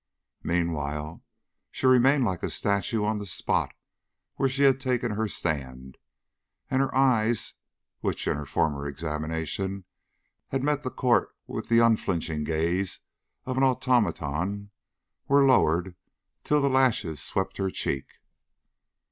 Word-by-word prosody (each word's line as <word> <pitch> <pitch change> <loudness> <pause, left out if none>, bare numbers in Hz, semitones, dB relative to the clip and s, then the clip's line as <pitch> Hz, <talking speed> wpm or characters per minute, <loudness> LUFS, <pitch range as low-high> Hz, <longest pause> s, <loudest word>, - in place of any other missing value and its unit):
Meanwhile, 80 -2 -2 0.5
she - - -5
remained 130 +1 +5
like 95 -5 -2
a - - -2
statue 100 +2 0
on 105 0 0
the 100 - -6
spot 90 - 0 0.6
where 135 - +1
she 135 +2 0
had 135 -1 +5
taken 125 -3 -1
her 110 +1 -1
stand, 65 -8 -4 0.7
and 130 - +3
her 135 - -1
eyes, 120 -4 +2 0.5
which - - -2
in - - +1
her 75 -1 -6
former 70 0 0
examination 80 +6 -3 0.6
had 135 -1 -2
met 150 0 +1
the 130 - -3
court 125 -1 +1
with - - -6
the 115 - +4
unflinching 85 -8 0
gaze 85 +5 -1 0.4
of 130 0 -3
an 135 - +3
automaton, 100 - 0 0.6
were 140 0 +5
lowered 90 -8 +3 0.5
till 150 -1 +2
the - - +4
lashes 125 - +1
swept 95 -1 -2
her 95 -1 0
cheek. 70 -7 -2
100 Hz, 130 wpm, -27 LUFS, 80-130 Hz, 0.7 s, remained